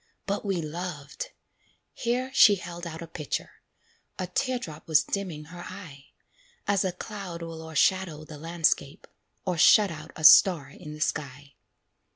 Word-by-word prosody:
"But 200 Hz, +1 st, -2 dB
we 195 Hz, -5 st, -1 dB
loved" 155 Hz, -2 st, -6 dB, 0.7 s
here 250 Hz, +2 st, -1 dB
she 210 Hz, -6 st, +7 dB
held 175 Hz, -1 st, -7 dB
out 165 Hz, 0 st, -7 dB
a -, -, -9 dB
picture; 155 Hz, -3 st, -5 dB, 0.6 s
A 185 Hz, -, -2 dB
tear 255 Hz, +6 st, -1 dB
drop 160 Hz, -10 st, -9 dB
was 155 Hz, -2 st, +4 dB
dimming 175 Hz, -3 st, -4 dB
her 175 Hz, +3 st, -11 dB
eye, 175 Hz, -7 st, -10 dB, 0.6 s
As 205 Hz, -1 st, +2 dB
a 190 Hz, -, 0 dB
cloud 180 Hz, -2 st, -7 dB
will 165 Hz, -1 st, -7 dB
o'ershadow 160 Hz, 0 st, +1 dB
the 155 Hz, -1 st, -10 dB
landscape, 165 Hz, -1 st, 0 dB, 0.4 s
Or 180 Hz, -3 st, -1 dB
shut 205 Hz, +3 st, +6 dB
out 155 Hz, 0 st, -9 dB
a 155 Hz, -, -8 dB
star 160 Hz, -3 st, +7 dB
in 150 Hz, +1 st, -10 dB
the 150 Hz, -, -10 dB
sky. 140 Hz, -2 st, -3 dB
170 Hz, 155 wpm, -27 LUFS, 155-190 Hz, 0.7 s, she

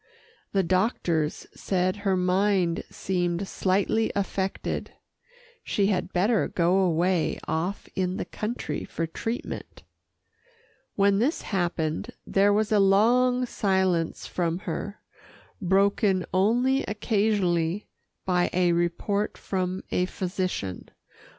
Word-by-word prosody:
The 195 Hz, -1 st, +2 dB
doctors 175 Hz, -4 st, 0 dB
said 185 Hz, 0 st, 0 dB
her 195 Hz, -2 st, 0 dB
mind 185 Hz, -1 st, +2 dB
seemed 175 Hz, 0 st, -1 dB
slightly 200 Hz, +5 st, +1 dB
affected 195 Hz, -1 st, -2 dB, 0.7 s
she 200 Hz, -, +1 dB
had 185 Hz, 0 st, -2 dB
better 205 Hz, +5 st, +2 dB
go 175 Hz, +2 st, +2 dB
away 175 Hz, -1 st, +1 dB
off 165 Hz, +6 st, -2 dB
in 185 Hz, 0 st, -1 dB
the -, -, -3 dB
country 215 Hz, -9 st, -4 dB
for 165 Hz, -, -3 dB
treatment. 225 Hz, +8 st, -5 dB, 1.1 s
When 200 Hz, 0 st, +3 dB
this 275 Hz, +9 st, 0 dB
happened, 175 Hz, +2 st, -2 dB
there 200 Hz, +1 st, +3 dB
was 215 Hz, +2 st, +1 dB
a 210 Hz, -, +4 dB
long 245 Hz, +6 st, +4 dB
silence 190 Hz, -7 st, 0 dB
from 170 Hz, -2 st, -1 dB
her, 200 Hz, +3 st, -4 dB, 0.6 s
broken 195 Hz, 0 st, +2 dB
only 245 Hz, +8 st, +3 dB
occasionally 205 Hz, -4 st, 0 dB, 0.4 s
by 180 Hz, -1 st, +2 dB
a 180 Hz, -1 st, +3 dB
report 175 Hz, +5 st, 0 dB
from 185 Hz, -1 st, -2 dB
a 180 Hz, -, +1 dB
physician. 185 Hz, -, -3 dB
190 Hz, 105 wpm, -26 LUFS, 175-205 Hz, 1.1 s, a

